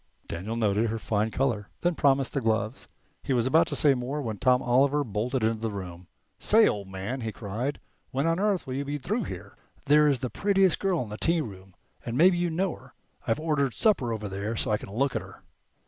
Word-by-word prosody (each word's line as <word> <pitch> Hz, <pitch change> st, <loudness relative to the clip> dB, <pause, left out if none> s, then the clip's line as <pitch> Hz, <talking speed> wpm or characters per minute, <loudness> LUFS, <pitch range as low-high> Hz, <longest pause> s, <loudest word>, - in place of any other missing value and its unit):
Daniel 100 Hz, +7 st, -4 dB
noted 110 Hz, 0 st, +1 dB
her 115 Hz, -, -2 dB
fine 110 Hz, 0 st, -1 dB
color, 115 Hz, -4 st, -1 dB
then 175 Hz, 0 st, +2 dB
promised 135 Hz, -3 st, +2 dB
the 140 Hz, -, -1 dB
gloves. 110 Hz, +1 st, -1 dB, 0.3 s
He 135 Hz, -, -1 dB
was 120 Hz, -2 st, +2 dB
about 160 Hz, +5 st, +4 dB
to -, -, -3 dB
say 145 Hz, -3 st, +5 dB
more 130 Hz, +3 st, -3 dB
when 110 Hz, -7 st, -4 dB
Tom 125 Hz, -1 st, +4 dB
Oliver 135 Hz, +4 st, +3 dB
bolted 120 Hz, +2 st, -2 dB
into 110 Hz, 0 st, +1 dB
the 115 Hz, -, -1 dB
room. 90 Hz, -3 st, -7 dB, 0.3 s
"Say, 220 Hz, +1 st, +5 dB
old 100 Hz, -2 st, -2 dB
man," 95 Hz, +7 st, -5 dB
he 110 Hz, -1 st, -3 dB
cried, 115 Hz, +7 st, -4 dB, 0.3 s
"when 135 Hz, +2 st, -1 dB
on 165 Hz, +1 st, +1 dB
earth 200 Hz, -2 st, +1 dB
will 130 Hz, -, -5 dB
you 140 Hz, +2 st, -2 dB
be 145 Hz, +1 st, -3 dB
through 210 Hz, -, -2 dB
here? 95 Hz, +2 st, -8 dB, 0.3 s
There's 150 Hz, -1 st, +5 dB
the 125 Hz, -, -3 dB
prettiest 195 Hz, -3 st, +2 dB
girl 190 Hz, -7 st, 0 dB
in 110 Hz, -, -10 dB
the 105 Hz, -, -6 dB
tearoom, 100 Hz, -, -2 dB, 0.3 s
and 120 Hz, +1 st, -4 dB
maybe 175 Hz, +2 st, +5 dB
you 175 Hz, 0 st, +1 dB
know 175 Hz, +2 st, -1 dB
her. -, -, -18 dB, 0.3 s
I've 115 Hz, -, +1 dB
ordered 150 Hz, -5 st, 0 dB
supper 165 Hz, -, +2 dB
over 110 Hz, -2 st, -3 dB
there, 100 Hz, +3 st, -4 dB
so 110 Hz, -, -1 dB
I 105 Hz, -, +1 dB
can -, -, -10 dB
look 135 Hz, +7 st, 0 dB
at -, -, 0 dB
her." -, -, -14 dB
125 Hz, 220 wpm, -27 LUFS, 110-150 Hz, 0.3 s, say